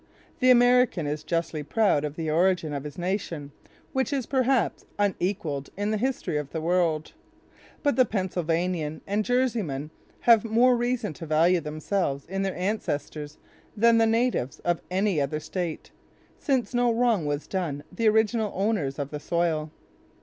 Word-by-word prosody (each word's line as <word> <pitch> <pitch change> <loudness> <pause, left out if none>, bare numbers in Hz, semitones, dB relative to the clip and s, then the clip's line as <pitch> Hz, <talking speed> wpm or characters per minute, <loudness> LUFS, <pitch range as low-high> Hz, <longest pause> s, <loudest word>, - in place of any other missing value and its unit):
The 255 - +4
American 245 -7 +5
is 150 +1 -2
justly 165 -2 -2
proud 150 0 +2
of 150 -1 -4
the 160 -1 -4
origin 170 -2 +2
of 140 0 -4
his 145 -1 -8
nation, 175 -5 -3 0.4
which 265 +1 0
is 270 -4 -1
perhaps 260 0 +1
unequaled 185 -8 -1
in 205 +1 -1
the 215 - +1
history 215 - -1
of 150 -2 -4
the 160 - -4
world; 165 -2 0 0.7
but 285 -1 +2
the 255 - +7
Pennsylvanian 175 -5 -1
and 205 +2 0
Jerseyman 215 - -1 0.3
have 230 -3 +6
more 235 +3 +4
reason 240 -5 -1
to 165 +1 -9
value 165 +3 +3
themselves 150 -1 -2
in 195 +2 -3
their 195 -1 -1
ancestors 150 -6 -3 0.4
than 230 +1 +5
the 225 - +4
natives 225 - 0
of 175 -1 0
any 190 -3 +1
other 140 +2 -1
state, 170 0 -5 0.5
since 255 -7 0
no 245 0 +3
wrong 230 -8 +2
was 145 0 -2
done 160 -7 -3
the 230 -1 +2
original 220 0 +2
owners 190 -9 0
of 145 -1 -4
the 150 - -4
soil. 160 -1 0
185 Hz, 155 wpm, -26 LUFS, 155-225 Hz, 0.7 s, the